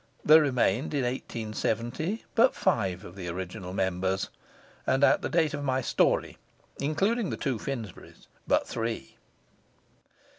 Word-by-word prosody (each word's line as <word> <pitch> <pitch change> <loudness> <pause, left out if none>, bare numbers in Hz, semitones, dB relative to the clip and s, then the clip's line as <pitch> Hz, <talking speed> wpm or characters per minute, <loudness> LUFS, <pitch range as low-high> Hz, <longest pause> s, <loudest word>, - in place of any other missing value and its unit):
There 155 +1 +8
remained 130 -1 +1
in 140 - +1
1870 120 - -2
but 235 +3 +4
five 95 -3 0
of 85 - -11
the 95 -3 -6
original 90 +1 -5
members, 95 0 -1 0.6
and 135 +2 +2
at - - +5
the - - -2
date 160 -3 +2
of 145 -1 -3
my 130 -1 +1
story, - - +1 0.4
including 195 - +1
the - - -3
two 130 -6 -1
Finsburys, 115 -6 -7 0.2
but - - +2
three. 115 - -4
120 Hz, 135 wpm, -28 LUFS, 95-145 Hz, 0.6 s, There